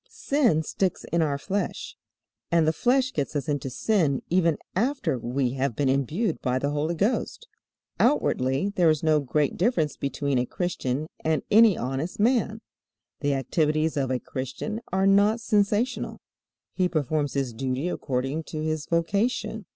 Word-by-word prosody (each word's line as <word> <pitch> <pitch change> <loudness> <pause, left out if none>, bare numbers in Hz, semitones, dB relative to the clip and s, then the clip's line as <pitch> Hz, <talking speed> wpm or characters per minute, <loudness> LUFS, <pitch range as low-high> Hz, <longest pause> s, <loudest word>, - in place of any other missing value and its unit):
Sin 245 - +1
sticks 185 +3 -1
in 170 - +2
our 145 -3 +1
flesh, 200 +7 -3 0.6
and 170 -2 +4
the 160 - +3
flesh 255 +5 +2
gets 145 +1 -2
us 145 +2 -2
into 145 -3 -2
sin 150 - +1
even 170 -3 +3 0.2
after 235 - 0
we 125 +2 -1
have 135 -2 -1
been 140 +1 +1
imbued 155 - 0
by 125 -1 0
the 140 +2 -1
Holy 150 +3 -1
Ghost. 235 - -1 0.5
Outwardly 140 - +2
there 175 -3 +4
is 155 -1 +1
no 155 -1 +4
great 145 +1 0
difference 175 - +1
between 140 -1 -1
a 125 - -1
Christian 150 -6 -2 0.2
and 155 -3 +1
any 220 -3 +6
honest 135 - -3
man. 225 -1 +2 0.6
The 145 -2 0
activities 155 +3 0
of 135 -3 0
a 130 - +1
Christian 135 - -5
are 190 +1 +2
not 200 +3 +4
sensational. 210 +3 0 0.5
He 185 -1 +1
performs 150 -2 -1
his 135 -4 -1
duty 130 +5 -2
according 135 0 -2
to 155 -1 -5
his 155 -1 -2
vocation. 200 +5 -1
155 Hz, 155 wpm, -26 LUFS, 140-200 Hz, 0.6 s, any